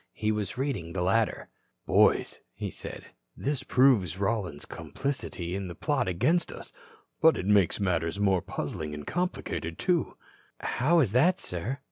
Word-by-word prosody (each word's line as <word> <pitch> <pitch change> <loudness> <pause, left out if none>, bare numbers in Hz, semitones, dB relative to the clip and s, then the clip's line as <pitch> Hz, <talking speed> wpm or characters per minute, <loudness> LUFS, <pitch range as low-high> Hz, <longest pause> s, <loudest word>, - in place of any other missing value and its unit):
He 110 0 0
was 105 +1 -3
reading 115 -12 -2
the 90 - -1
latter. 105 +4 +1 0.4
"Boys," - - +3 0.3
said - - -8
he, - - -16 0.3
"this 140 -1 0
proves 125 - +3
Rollins's 95 -7 -2
complicity 95 -10 -4
in 95 -2 -4
a 85 - -7
plot 145 -6 0
against 155 - +1
us. - - -10 0.5
But 160 0 +6
it - - -3
makes 100 -2 +3
matters 85 -2 0
more 95 -3 +3
puzzling 75 -2 -4
and 75 -1 -8
complicated, 175 - -3
too." 180 -3 0 0.4
"How 165 +6 +2
is 115 -9 +1
that, 170 - +4
sir?" 105 - -4
105 Hz, 150 wpm, -28 LUFS, 90-135 Hz, 0.5 s, But